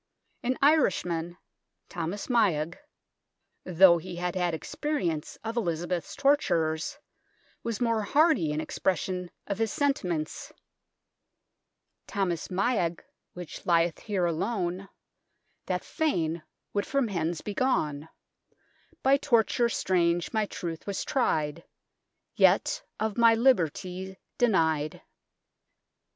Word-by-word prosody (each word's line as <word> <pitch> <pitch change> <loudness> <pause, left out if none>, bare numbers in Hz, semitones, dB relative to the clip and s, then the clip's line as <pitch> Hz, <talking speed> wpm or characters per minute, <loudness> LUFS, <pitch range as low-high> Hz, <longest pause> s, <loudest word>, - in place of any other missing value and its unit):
An 255 +1 -1
Irishman, 180 - +2 0.5
Thomas 175 +4 -4
Miagh, 175 - +1 0.9
though 180 -1 +6
he 180 +2 -8
had 175 0 -2
had 175 -3 0
experience 170 - -3
of 225 +1 -4
Elizabeth's 175 -3 -2
torturers, 165 - +1 0.6
was 230 -3 -3
more 230 -2 +1
hearty 285 - +3
in 150 - -1
expression 180 +1 -2 0.2
of 200 +1 -3
his 225 -2 +1
senti 280 -9 0
ments: 155 -3 -4 0.8
" - - -54
Tomas 185 -5 -1
Miagh 185 -3 0 0.4
whiche 175 -2 -8
lieth 170 -1 +3
here 195 -5 -1
alon 180 +2 -2 0.8
That - - -1
fayne 170 - -1 0.3
would 205 0 -1
from 275 -3 +1
hens 170 -4 -2
be 210 - -5
gon 160 - 0 0.9
By 270 +1 +5
tortyre 240 -3 +2
straynge 175 -5 +1
mi 215 -2 +1
troyth 170 -3 -6
was 200 - -2
tryed 160 - 0 0.7
Yet - - +3 0.2
of 220 0 -1
my 230 -1 +7
libertie 190 - +1 0.2
denyed." 160 -10 +2
185 Hz, 110 wpm, -28 LUFS, 170-230 Hz, 0.9 s, my